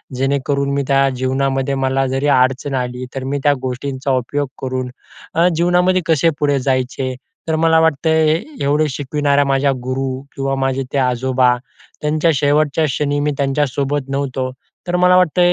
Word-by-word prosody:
जेणेकरून 140 +1 0
मी 140 - 0
त्या 135 0 +3
जीवनामध्ये 135 +1 0
मला 135 0 0
जरी 135 +3 -1
अडचण 135 +1 +2
आली, 125 0 -3
तर 135 - -3
मी 140 +2 -2
त्या 145 -1 +4
गोष्टींचा 130 +1 -3
उपयोग 145 +3 -2
करून 130 -1 -3 0.5
अ, 170 +2 +4
जीवनामध्ये 180 +2 +2
कसे 165 0 +3
पुढे 145 -2 +2
जायचे, 130 0 -1 0.3
तर 160 - +1
मला 160 0 +3
वाटतं 160 0 +1 0.3
अ, - - -1 0.2
एवढे 150 +2 +2
शिकविणाऱ्या 145 +1 0
माझ्या 135 0 +2
गुरू 130 0 -3
किंवा 135 0 -1
माझे 135 0 -1
ते - - 0
आजोबा 125 -1 +2 0.5
त्यांच्या 155 +2 +2
शेवटच्या 145 +2 +2
क्षणी 145 +1 -1
मी 150 +1 0
त्यांच्यासोबत 140 0 -1
नव्हतो. 135 -2 -2 0.4
तर 175 - 0
मला 180 0 +5
वाटत, 180 -1 +2
140 Hz, 155 wpm, -18 LUFS, 130-145 Hz, 0.5 s, मला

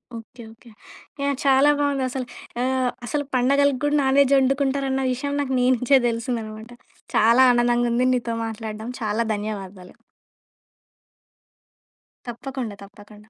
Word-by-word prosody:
Okay. 230 +2 -11
Okay. 230 +1 -18 0.5
Yeah! 280 0 0
చాలా 275 +2 +5
బావుందసలు. 270 -3 -1 0.4
ఆహ్, 260 0 0 0.2
అసలు 290 +3 -2
పండగలకి 275 +1 +2
కూడా 290 0 +1
నాన్‌వెజ్ 275 +1 +3
ఒండుకుంటారన్న‌ 270 0 0
విషయం 285 +3 -4
నాకు 265 -2 -3
నీ‌నుంచే 255 +1 +3
తెలిసిందన్నమాట. 230 -1 -4 0.4
చాలా 230 +4 +5
ఆనందంగుంది 240 +1 +1
నీతో 235 -2 -3
మాట్లాడడం. 220 0 -6
చాలా 215 +1 -1
ధన్యవాదాలు. 200 -3 -7 2.3
తప్పకుండా. 240 -2 -6
తప్పకుండా. 210 +1 -16
250 Hz, 105 wpm, -23 LUFS, 225-270 Hz, 2.3 s, చాలా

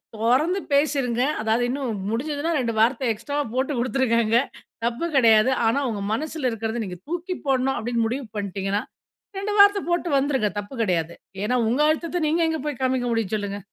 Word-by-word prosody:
தொறந்து 260 - +2
பேசிருங்க. 275 -4 +1 0.2
அதாவது 225 +2 +1
இன்னும் 250 -6 -3
முடிஞ்சிதுனா, 290 +7 -2
2 235 -2 -1
வார்த்த 240 +1 +2
எக்ஸ்ட்ராவா 285 +7 -3
போட்டு 260 +3 0
குடுத்துருக்காங்க 235 -2 +1 0.5
தப்பு 240 +8 -1
கிடையாது. 230 -2 +5 0.2
ஆனா, 230 +5 +2
உங்க 210 -3 -4
மனசுல 295 +1 -2
இருக்குறத 225 +1 -3
நீங்க 180 -1 -7
தூக்கி 350 +2 -3
போடணும் 270 0 +1
அப்படின்னு 235 0 -1
முடிவு 260 +3 -3
பண்ணிட்டீங்கன்னா. 200 +1 -2 0.6
2 400 +2 -2
வார்த்த 405 0 +7
போட்டு 345 0 0
வந்துருங்க 270 -6 +1
தப்பு 205 +5 -8
கிடையாது. 170 -4 -1 0.3
ஏன்னா, 250 +4 +1
உங்க 250 +6 +1
அழுத்தத்த 330 +1 -1
நீங்க 330 +3 +1
எங்க 320 - -2
போய் 290 -4 -3
காமிக்க 255 -1 +1
முடியும், 225 -3 -1
சொல்லுங்க? 205 -1 -3
250 Hz, 160 wpm, -24 LUFS, 225-290 Hz, 0.6 s, வார்த்த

